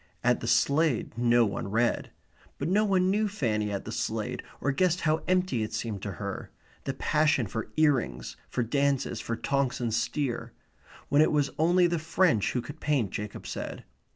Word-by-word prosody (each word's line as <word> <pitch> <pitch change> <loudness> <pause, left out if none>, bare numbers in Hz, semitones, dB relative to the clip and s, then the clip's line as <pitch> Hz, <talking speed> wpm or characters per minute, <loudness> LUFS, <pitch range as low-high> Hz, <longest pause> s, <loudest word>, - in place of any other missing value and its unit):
At - - +3
the - - -5
Slade 140 -6 +2
no 120 0 +4
one 100 -1 -3
read. 115 +4 +1 0.5
But 145 - -2
no 205 +3 +3
one 190 -2 +2
knew 210 +2 +2
Fanny 110 - -1
at 100 -1 -4
the - - -5
Slade, - - -2 0.2
or 145 - 0
guessed 180 +4 +1
how 155 0 +1
empty 185 -10 +1
it 110 - -3
seemed 110 -3 -3
to 100 -1 -4
her; 100 -1 -5 0.4
the 135 - -2
passion 150 -3 +2
for 110 +3 -5
ear 155 -2 +5
rings, 60 - -5
for 125 - -1
dances, 140 +3 0
for 115 - -3
Tonks 135 +2 0
and 120 -3 -1
Steer 120 -1 -2 0.6
when 145 +1 +5
it 155 - +4
was 145 -2 +1
only 175 +3 +4
the 170 -1 +1
French 160 - +2
who 125 - -1
could 145 +2 -9
paint, 135 -10 0
Jacob 105 0 -6
said. - - -5
140 Hz, 185 wpm, -28 LUFS, 115-160 Hz, 0.6 s, ear